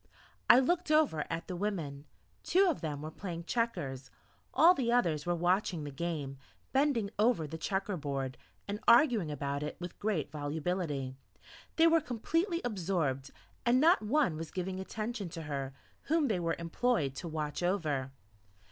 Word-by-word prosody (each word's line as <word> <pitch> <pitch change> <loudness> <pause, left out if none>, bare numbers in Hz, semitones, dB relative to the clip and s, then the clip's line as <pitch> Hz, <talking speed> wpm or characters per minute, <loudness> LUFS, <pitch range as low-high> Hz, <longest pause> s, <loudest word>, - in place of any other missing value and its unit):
I - - +10
looked 340 +6 +2
over 305 - +3
at 165 +1 -4
the 185 - -4
women. 165 -8 -3 0.4
Two 380 +2 +4
of 335 - 0
them 150 -3 -4
were 155 - -5
playing 170 -1 -6
checkers; 145 - -2 0.4
all 340 +3 +7
the 245 -7 0
others 170 -11 +1
were 175 - +2
watching 175 -1 +1
the 145 - -5
game, 145 -3 -4 0.3
bending 265 -7 +2
over 215 -7 +3
the 160 +2 -7
checker 195 +3 -1
board, 135 -3 -3 0.3
and 205 +1 -3
arguing 235 - +5
about 140 -1 -3
it 150 - -4
with 175 0 -7
great 200 -10 -1
volubility; 150 -2 -2 0.6
they 325 - +5
were 330 0 +5
completely 330 - -1
absorbed, 170 - -1 0.3
and 245 +1 +4
not 330 +5 +5
one 225 - +1
was 165 -1 -5
giving 185 +2 -4
attention 215 0 -4
to 165 -1 -7
her 140 -3 -3 0.3
whom 310 -2 +2
they 200 -5 +1
were 165 -1 0
employed 170 - 0
to 175 - -5
watch 155 -1 -3
over. 155 -8 0
175 Hz, 160 wpm, -32 LUFS, 150-235 Hz, 0.6 s, I